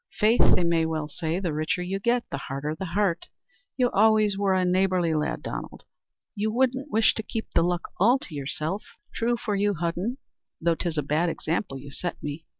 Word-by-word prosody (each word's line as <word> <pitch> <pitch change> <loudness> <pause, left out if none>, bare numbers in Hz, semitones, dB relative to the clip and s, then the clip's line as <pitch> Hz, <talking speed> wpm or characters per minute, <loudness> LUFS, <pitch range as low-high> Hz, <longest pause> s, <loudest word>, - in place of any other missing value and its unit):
"Faith, 220 +3 +4
they 180 - +1
may 170 -1 +2
well 160 -2 -1
say, 160 +3 -2
the 175 -5 -2
richer 155 +3 -1
you 190 +2 -2
get, 235 +4 +1
the - - -2
harder 140 +3 -3
the 190 +4 -5
heart. 195 -5 +1 0.5
You 250 -2 +2
always 215 0 +4
were 195 -1 +2
a 185 -1 +2
neighbourly 180 -2 +2
lad, 150 -1 -1
Donald. - - -6 0.5
You 215 0 -1
wouldn't 260 +4 +1
wish 220 -2 +4
to - - -3
keep 220 +1 -5
the - - +4
luck 175 0 0
all 235 +8 +5
to 180 - -10
yourself?" 155 +7 -3 0.3
"True 240 +1 0
for 215 -3 -2
you, 205 0 +1
Hudden, 175 - -2 0.4
though 170 0 +2
'tis 165 -1 -3
a 150 - +1
bad 155 +5 +1
example 160 -3 -2
you 140 +1 -10
set 175 +4 -4
me. 150 +2 -5
180 Hz, 200 wpm, -26 LUFS, 160-215 Hz, 0.5 s, all